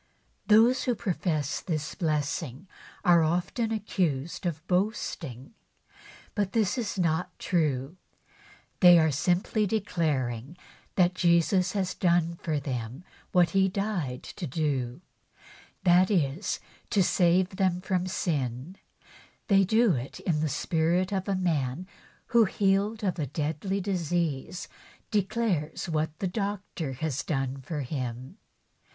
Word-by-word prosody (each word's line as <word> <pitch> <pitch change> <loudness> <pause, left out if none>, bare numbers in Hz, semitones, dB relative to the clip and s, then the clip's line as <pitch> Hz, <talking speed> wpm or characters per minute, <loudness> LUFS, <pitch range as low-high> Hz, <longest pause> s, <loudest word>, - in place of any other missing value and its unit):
Those 230 +4 +5
who 245 - +1
profess 170 - -1
this 155 -4 -3
blessing 150 -3 -2 0.4
are 170 -2 +6
often 180 +8 0
accused 175 -7 -1
of 160 -1 -4
boasting. 180 - -2 0.8
But 205 -3 -1
this 220 -4 +2
is 230 -5 -3
not 170 -1 0
true. 150 -2 -1 0.8
They 175 -2 +9
are 160 -1 +4
simply 180 - +1
declaring 155 - -1 0.4
that 180 -1 +4
Jesus 180 +1 +3
has 190 -3 -1
done 170 -2 +2
for 155 -3 -1
them 125 +1 -5 0.3
what 180 -2 +4
He 195 -1 +3
died 185 - -2
to 175 - -6
do 135 -2 -2 0.4
— - - -23
that 180 0 +5
is, 170 -2 0 0.3
to 200 -4 +3
save 180 +1 +2
them 185 -2 +2
from 185 -1 -1
sin, 170 -5 0
and 130 +9 -6 0.7
they 195 -1 +6
do 220 +3 +4
it 125 +1 -5
in 160 -4 0
the 155 0 0
spirit 170 +6 0
of 190 0 -2
a 200 - +1
man 160 -4 -1 0.5
who, 235 -2 +7
healed 200 +3 +1
of 185 -3 -1
a 145 - -1
deadly 160 +8 -2
disease, 175 -3 -2 0.4
declares 200 -6 0
what 155 -1 -1
the 190 - -1
doctor 195 -6 -3
has 145 +1 -2
done 135 -3 -2
for 150 +3 -4
him. 130 -2 -5
175 Hz, 130 wpm, -28 LUFS, 150-195 Hz, 0.8 s, They